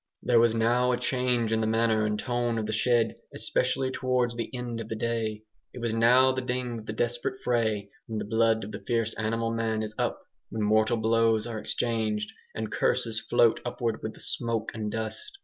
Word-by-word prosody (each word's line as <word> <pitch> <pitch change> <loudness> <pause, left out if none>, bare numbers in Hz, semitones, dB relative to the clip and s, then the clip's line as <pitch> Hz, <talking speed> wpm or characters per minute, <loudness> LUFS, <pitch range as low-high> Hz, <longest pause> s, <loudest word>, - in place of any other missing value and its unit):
There 120 -2 +4
was 115 -1 +4
now 120 +2 +3
a 125 - +1
change 125 -2 +1
in 110 - +2
the 110 - +1
manner 110 -1 +2
and 105 0 -1
tone 120 0 -1
of 110 - -1
the 110 - -2
shed, 120 +1 +3 0.2
especially 130 -1 0
towards 125 -2 0
the 115 -2 -3
end 125 -2 -4
of 115 -1 -6
the 110 - -2
day. 110 -2 -2 0.3
It - - -6
was 115 -2 -1
now 125 +3 +5
the 130 0 -2
ding 125 -2 -2
of 110 - -11
the 110 - -3
desperate 120 +3 -2
fray, 110 -4 0 0.2
when 110 - -4
the - - -3
blood 110 +1 +2
of 105 - -7
the - - -7
fierce 115 -2 +1
animal 115 +1 -1
man 110 -1 0
is 110 0 -5
up, - - -1 0.3
when 110 -1 -2
mortal 110 +2 +3
blows 115 0 +2
are 115 -2 -4
exchanged, 110 -2 -1 0.2
and 110 -1 -3
curses 115 -3 0
float 115 0 +3
upward 120 -2 -2
with 110 - -5
the - - -14
smoke 115 -2 -2
and 105 -2 -3
dust. 115 - -5
115 Hz, 205 wpm, -28 LUFS, 110-120 Hz, 0.3 s, now